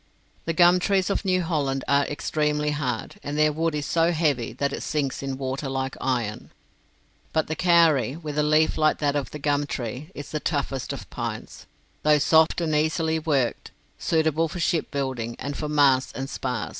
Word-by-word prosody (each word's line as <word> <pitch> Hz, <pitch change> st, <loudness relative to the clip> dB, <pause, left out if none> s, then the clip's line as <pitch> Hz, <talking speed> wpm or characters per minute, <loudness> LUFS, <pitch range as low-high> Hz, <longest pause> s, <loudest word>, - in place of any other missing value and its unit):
The 165 Hz, -, -1 dB
gum 175 Hz, +2 st, +5 dB
trees 190 Hz, +1 st, +1 dB
of -, -, -1 dB
New 185 Hz, -2 st, +1 dB
Holland 140 Hz, -5 st, -1 dB
are 140 Hz, 0 st, +3 dB
extremely 150 Hz, 0 st, -1 dB
hard, 135 Hz, -, -3 dB
and 145 Hz, +1 st, -4 dB
their 155 Hz, 0 st, +3 dB
wood 165 Hz, 0 st, -1 dB
is 145 Hz, -1 st, -2 dB
so 165 Hz, +2 st, +2 dB
heavy 145 Hz, -8 st, 0 dB
that 140 Hz, +3 st, -1 dB
it -, -, -4 dB
sinks 145 Hz, -4 st, -2 dB
in 135 Hz, -1 st, -4 dB
water 135 Hz, +1 st, -3 dB
like 130 Hz, 0 st, -2 dB
iron. 120 Hz, -5 st, -2 dB, 0.8 s
But 160 Hz, -, +2 dB
the 160 Hz, -, -3 dB
kauri, 160 Hz, -8 st, +4 dB
with 155 Hz, -3 st, -6 dB
a -, -, +5 dB
leaf 155 Hz, +1 st, +2 dB
like 155 Hz, 0 st, +3 dB
that 145 Hz, -1 st, 0 dB
of 145 Hz, -2 st, -1 dB
the -, -, -7 dB
gum 145 Hz, 0 st, 0 dB
tree, 125 Hz, +3 st, -5 dB
is 145 Hz, -, -8 dB
the 155 Hz, -, -2 dB
toughest 140 Hz, -4 st, -2 dB
of -, -, -7 dB
pines, -, -, -6 dB, 0.3 s
though 150 Hz, 0 st, +4 dB
soft 160 Hz, +4 st, +4 dB
and 160 Hz, -2 st, 0 dB
easily 160 Hz, +1 st, +1 dB
worked 140 Hz, -6 st, -1 dB, 0.3 s
suitable 160 Hz, 0 st, +1 dB
for 175 Hz, -, -7 dB
shipbuilding, 130 Hz, -8 st, -1 dB
and 140 Hz, +2 st, -5 dB
for 150 Hz, -, -4 dB
masts 140 Hz, -3 st, +3 dB
and 135 Hz, 0 st, -4 dB
spars. 125 Hz, -5 st, -3 dB
150 Hz, 185 wpm, -25 LUFS, 135-160 Hz, 0.8 s, gum